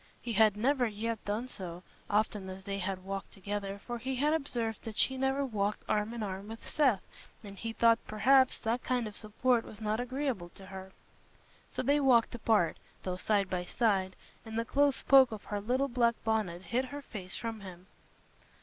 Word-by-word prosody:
He 235 - -4
had 215 -2 +5
never 255 +2 +2
yet 220 +1 -3
done 215 +5 -2
so, 180 -6 -7 0.3
often 210 -2 0
as 190 +1 -8
they 195 +1 -3
had 185 -1 -3
walked 195 0 -5
together, 200 0 -4
for 240 -1 -4
he 260 +3 -2
had 295 +4 +2
observed 240 -8 -2
that 220 -2 -7
she 265 - +4
never 270 +1 +1
walked 210 -4 -1
arm 210 +1 +1
in 235 -2 -4
arm 195 0 -5
with 225 +1 -9
Seth, 265 -10 +2 0.4
and 200 -1 -9
he 225 +3 -4
thought, 230 0 +4
perhaps, 260 +5 +4
that 235 +2 -1
kind 250 -2 0
of 210 -1 -7
support 230 +3 +1
was 215 - -11
not 215 0 -1
agreeable 250 -7 -2
to 195 - -11
her. 190 0 -9 0.8
So - - -3
they 285 +3 +3
walked 255 -5 +4
apart, 220 -7 +2 0.3
though 185 -1 -2
side 200 +1 +1
by 180 -1 -2
side, 190 -1 +1 0.3
and 220 -1 -6
the 230 - 0
close 280 +2 +2
poke 265 -3 +7
of 215 -2 -6
her 205 -1 -3
little 255 +6 +1
black 235 -2 +2
bonnet 210 -6 0
hid 250 +6 0
her 285 +2 -7
face 190 -7 -5
from 225 -2 -4
him. 185 -2 -10
220 Hz, 195 wpm, -31 LUFS, 200-250 Hz, 0.8 s, poke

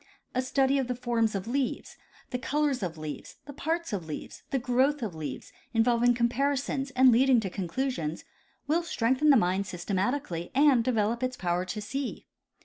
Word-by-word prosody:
A 255 - +1
study 270 +1 +2
of 260 - -1
the 250 - -2
forms 235 -3 0
of 195 +2 -3
leaves, 265 +1 -2 0.4
the 250 - -2
colors 290 0 0
of 170 -4 -3
leaves, 155 -1 -7
the 285 - -9
parts 325 0 -2
of' 180 -5 -3
leaves, 150 - -7
the 275 - 0
growth 260 +3 +1
of 210 -6 -3
leaves, 145 -5 -6 0.2
involving 240 +1 +4
comparisons 270 +3 0
and 260 0 +7
leading 255 +1 +5
to 190 -4 -4
con 185 -1 -3
clusions, 170 - -2 0.4
will 315 +4 +2
strengthen 265 -2 +1
the 280 - +8
mind 190 -1 +1
systematically 185 - -2
and 275 -4 +5
develop 230 -1 +1
its 255 0 -2
power 175 0 -1
to 195 +4 -4
see. 270 +5 -4
245 Hz, 175 wpm, -28 LUFS, 195-270 Hz, 0.4 s, the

